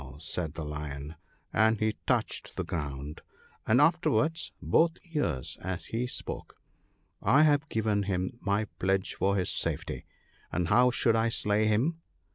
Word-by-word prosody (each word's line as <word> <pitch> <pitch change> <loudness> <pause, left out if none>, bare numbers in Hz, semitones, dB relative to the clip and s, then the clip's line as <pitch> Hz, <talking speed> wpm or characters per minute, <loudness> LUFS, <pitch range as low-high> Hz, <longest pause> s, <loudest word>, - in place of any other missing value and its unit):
said 80 0 -3
the 80 - -4
Lion, 75 -1 -5 0.4
and 110 +1 +3
he 110 -1 +1
touched - - -1
the - - -2
ground, 75 -1 -5 0.5
and 115 +4 +5
afterwards 160 0 +2
both 165 0 +3 0.2
ears, 80 - -1
as 95 0 -4
he 120 +2 -2
spoke, - - -6 0.4
" - - -43 0.2
I 135 +9 +5
have 145 0 +3
given 110 -2 +1
him 95 +5 -2
my 100 +1 +1
pledge 95 +1 +1
for 100 +1 +1
his 90 -3 +1
safety, - - -2 0.5
and 90 -1 -1
how 125 +4 +6
should 120 -2 +2
I 115 +1 +2
slay 105 -1 +1
him 135 +11 +1
105 Hz, 150 wpm, -29 LUFS, 90-125 Hz, 0.5 s, how